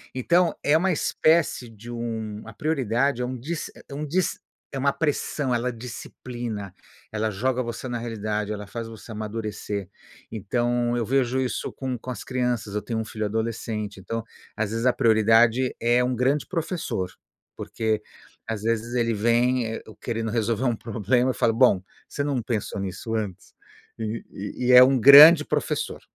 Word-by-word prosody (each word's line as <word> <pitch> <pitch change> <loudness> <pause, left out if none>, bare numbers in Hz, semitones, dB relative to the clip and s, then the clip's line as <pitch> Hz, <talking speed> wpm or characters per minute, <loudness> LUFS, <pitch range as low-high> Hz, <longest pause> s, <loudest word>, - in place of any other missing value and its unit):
Então 170 +7 +2
é 150 +2 +4
uma 185 +2 +1
espécie 155 -5 +2
de 115 +2 -11
um 110 -3 -4
a 115 - -9
prioridade 135 -2 0
é - - 0
um 125 +1 -4
dis 155 +7 -5 0.2
é - - -8
um 150 +1 -3
dis 180 +3 0 0.3
é 135 - -4
uma 140 +1 +2
pressão, 145 -3 -1
ela 125 +1 -1
disciplina, 120 -3 -7 0.4
ela 110 0 -1
joga 130 +5 0
você 120 +2 -5
na 120 -1 -3
realidade, 105 -2 -3
ela 105 -1 -5
faz 115 +1 -6
você 115 0 -11
amadurecer. 105 -2 -4 0.4
Então, 120 +3 0
eu 115 - -1
vejo 130 0 +1
isso 130 - -2
com 130 -2 -3
com 130 - -10
as - - -6
crianças, 125 -5 -2
eu 105 - 0
tenho 110 +2 -3
um 110 - -3
filho 110 -1 -4
adolescente, 110 -2 -3
então, 115 +4 -4 0.3
às 105 -1 -1
vezes, 115 +2 -2
a 125 - +4
prioridade 115 +3 +4
é 120 +2 +3
um 125 0 0
grande 135 +4 +1
professor, 165 - -3 0.4
porque, 110 -1 -2 0.5
às 110 -2 -4
vezes, 115 +2 -1
ele 115 -1 +1
vem, 120 +3 +2
eh, 115 - -5 0.2
querendo 115 -2 -2
resolver 115 +1 0
um 120 - +2
problema, 115 +3 0
eu - - -8
falo: 115 - +2
"Bom, 110 -6 +4 0.3
você 145 - -2
não 140 -4 -1
pensou 110 -3 -3
nisso 100 +4 -5
antes?". 105 -5 -5 0.5
E 110 +1 -5
e - - +7
é 125 0 +11
um 130 -1 +4
grande 150 +5 +10
professor, - - -2
120 Hz, 170 wpm, -25 LUFS, 110-130 Hz, 0.5 s, é